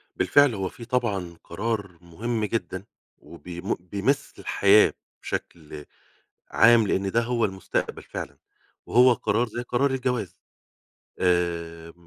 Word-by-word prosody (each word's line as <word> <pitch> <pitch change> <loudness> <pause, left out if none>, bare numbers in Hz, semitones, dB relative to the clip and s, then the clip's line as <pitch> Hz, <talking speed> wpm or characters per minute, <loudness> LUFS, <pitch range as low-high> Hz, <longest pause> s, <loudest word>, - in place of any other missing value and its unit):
بالفعل 125 +8 +4
هو 95 -1 -2
في 115 - -11
طبعًا 100 -9 -2
قرار 100 -1 -4
مهم 110 +6 -3
جدًا، 100 -4 -3 0.3
وبي 85 +1 -10 0.2
بيمس 100 +10 -1
الحياة 100 +1 +4 0.3
بشكل 75 -3 -6 0.7
عام، 115 0 +6
لأن 95 0 0
ده 115 - +2
هو 120 -1 0
المستقبل 95 -2 -3
فعلًا - - -7 0.5
وهو 125 +1 +5
قرار 120 +1 0
زي 120 +2 -5
قرار 125 +3 0
الجواز. 125 -7 -2 0.8
آآ 85 -2 -1
100 Hz, 115 wpm, -25 LUFS, 90-120 Hz, 0.8 s, عام